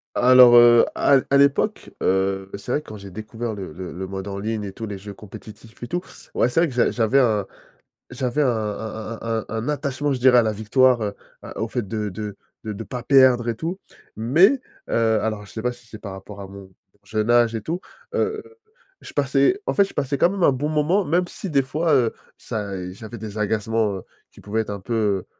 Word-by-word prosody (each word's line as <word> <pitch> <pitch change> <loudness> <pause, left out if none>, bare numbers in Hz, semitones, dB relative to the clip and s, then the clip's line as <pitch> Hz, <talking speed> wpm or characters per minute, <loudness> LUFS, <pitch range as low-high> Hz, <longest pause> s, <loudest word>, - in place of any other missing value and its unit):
Alors, 125 -1 +7
heu, 120 0 +8
à 140 - +4
l 130 - 0
à 140 - +4
l'époque, 140 +10 +2
heu, 95 0 0
c'est 100 +5 -7
vrai, 150 - +1
quand 110 - -10
j'ai 100 -1 -11
découvert 110 +3 -5
le 95 -5 -7
le 90 +2 -7
le 95 +2 -5
mode 95 +1 -6
en 100 0 -5
ligne 110 +1 -3
et 100 - -5
tous 110 +2 -6
les 100 - -5
jeux 100 +1 -9
compétitifs 110 +3 -13
et 120 - -4
tout, 175 +1 -2 0.3
ouais, 120 - +2
c'est 165 - +2
vrai 175 - +3
que 135 - -7
j'a 120 - +3
j'avais 120 +3 +2
un 110 -6 +2 0.6
j'avais 125 +3 -1
un 145 - +3
un 110 0 -4
un 115 -1 -1
un - - -13
un 115 +4 -3
attachement, 145 -1 -1
je 130 - -1
dirais, 125 -1 +6
à - - +6
la 110 -1 0
victoire, 120 +4 +3
heu, 100 -1 -2 0.3
à - - -8
au 110 - -1
fait 115 -3 -3
de 105 -1 -3
de 105 +1 -6 0.3
de 110 - -4
de 110 +2 -6
pas 120 +3 -6
perdre 130 -3 +5
et 115 - 0
tout 165 +8 -4 0.4
mais, 170 - +4 0.3
heu- 110 -1 +2
alors 110 -2 -3
je - - -15
sais 110 - -6
pas 125 +2 0
si 120 -1 -15
c'est 110 -2 -11
par 100 -3 -7
rapport 100 +1 -10
à 100 - -7
mon 95 0 -12 0.3
jeune 110 +1 -2
âge 120 -1 +4
et 110 - -3
tout- 165 - -3 0.4
heu, 435 0 0 0.6
je - - -11
passais, 380 +3 +2
en - - +1
fait, 200 - +6
je - - -12
passais 140 +1 -1
quand 175 - +3
même 200 - -4
un - - +6
bon 135 +3 -2
moment 155 +6 +1
même 175 +4 +1
si 185 +1 -7
des 140 -2 +4
fois, 155 +4 0
heu, 120 -4 +3 0.3
ça, 100 -2 -4
eh, 90 -1 -5
j'avais 110 +3 -9
des 110 -1 -7
agacements, 105 -1 0
heu, 95 - -9 0.3
qui - - -17
pouvaient 110 +2 -1
être 110 - -6
un 100 - -5
peu 100 -1 -1
115 Hz, 235 wpm, -22 LUFS, 105-130 Hz, 0.6 s, heu